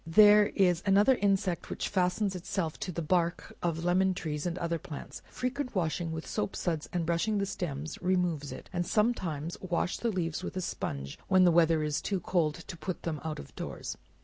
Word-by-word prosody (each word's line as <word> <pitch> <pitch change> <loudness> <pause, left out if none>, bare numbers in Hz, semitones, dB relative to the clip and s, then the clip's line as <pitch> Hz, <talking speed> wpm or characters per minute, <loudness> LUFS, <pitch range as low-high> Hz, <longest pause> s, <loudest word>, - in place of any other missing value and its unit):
There 210 +4 +7
is 180 -3 +3
another 205 +6 +5
insect 195 -6 0
that - - -4
fastens 190 +1 +1
itself 180 -3 -3
to 185 - -3
the 170 -1 -3
bark 170 +1 0
of 170 -1 -1
lemon 185 +1 +3
trees, 155 -3 -3
and 175 0 -2
other 170 -1 -1
plants; 145 -1 -8
frequent 255 0 -3
washing 170 -1 0
with 160 0 -4
soap 105 - -2
suds 160 -3 -2
and 175 -2 -1
brushing 170 +6 +1
the 200 - +1
sterns, 155 -5 -4
removes 180 -6 0
it, - - -8
and 175 -1 0
some 215 +6 +3
times 165 -5 -4
wash 175 0 -1
the 235 - 0
leaves 175 -4 -2
with 185 - -5
a - - 0
sponge, 70 - -4
when 185 -1 +5
the 175 - +6
weather 165 -2 +4
is 150 -1 -1
too 195 -2 -1
cold 160 -4 +1
to 170 +2 -8
put 185 +2 -5
them 155 -3 -3
out 160 -1 -3
of 70 - -10
doors. - - -5
175 Hz, 200 wpm, -30 LUFS, 160-190 Hz, -, There